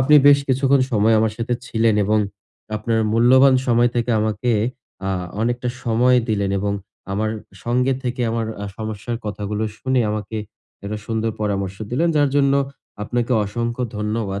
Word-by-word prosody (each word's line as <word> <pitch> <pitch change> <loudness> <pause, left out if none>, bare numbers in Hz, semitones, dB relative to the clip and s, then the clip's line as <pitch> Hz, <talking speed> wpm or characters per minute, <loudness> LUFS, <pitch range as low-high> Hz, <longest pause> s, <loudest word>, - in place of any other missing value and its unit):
আপনি 135 +4 +4
বেশ 145 0 +8
কিছুক্ষণ 135 +1 +3
সময় 110 +1 +4
আমার 110 -1 +1
সাথে 120 +1 -1
ছিলেন 115 -2 +2
এবং 105 +2 +2 0.6
আপনার 110 +1 0
মূল্যবান 130 +4 +6
সময় 120 0 +3
থেকে 120 +1 0
আমাকে 110 +3 0 0.6
আ - - 0 0.3
অনেকটা 120 +2 -1
সময় 125 +2 +3
দিলেন, 100 -3 0
এবং 100 +1 -1 0.4
আমার 110 +2 0 0.3
সঙ্গে 125 +2 +2
থেকে 125 0 -3
আমার 115 -1 -1 0.3
সমস্যার 110 +1 -4
কথাগুলো 105 +1 -3 0.2
শুনে 130 -1 +1
আমাকে 105 +1 -4 0.5
একটা 105 +1 -4
সুন্দর 115 0 -1
পরামর্শ 100 -2 -2
দিলেন, 165 +8 +1
যার 145 -1 +4
জন্য 140 -1 +4 0.5
আপনাকে 120 +3 -1
অসংখ্য 120 +4 -3
ধন্যবাদ। 105 -2 -2
115 Hz, 145 wpm, -21 LUFS, 105-125 Hz, 0.6 s, বেশ